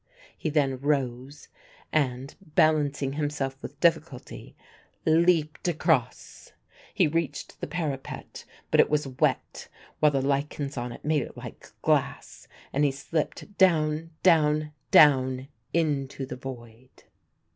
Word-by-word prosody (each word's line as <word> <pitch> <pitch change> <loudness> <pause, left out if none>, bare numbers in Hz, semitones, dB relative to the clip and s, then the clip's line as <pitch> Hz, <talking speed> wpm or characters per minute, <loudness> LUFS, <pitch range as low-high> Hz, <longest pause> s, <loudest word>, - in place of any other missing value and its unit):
He 155 - -3
then 140 -4 +1
rose 135 -1 -2 0.5
and, 135 -2 0
balancing 150 -5 +1
himself 145 -2 -2
with 140 - -9
difficulty, 160 -6 -1 0.5
leaped 160 0 +2
across. 170 -2 -1 0.4
He 185 -6 +3
reached 150 -2 -3
the - - -3
parapet; 150 -4 -5 0.3
but - - +3
it - - +6
was 150 -1 +1
wet, 130 -1 -1 0.3
while 150 - +5
the 135 -2 0
lichens 140 +1 -1
on 120 0 -4
it 120 - -11
made 150 -1 +2
it - - -8
like - - -10
glass - - -1 0.3
and 145 - +2
he 145 - +4
slipped 155 +8 -4
down, 160 -3 +3
down, 155 -3 +3 0.2
down, 130 -3 +5 0.2
into 140 -5 -1
the 130 - -7
void. 125 -1 -11
145 Hz, 125 wpm, -27 LUFS, 135-155 Hz, 0.5 s, it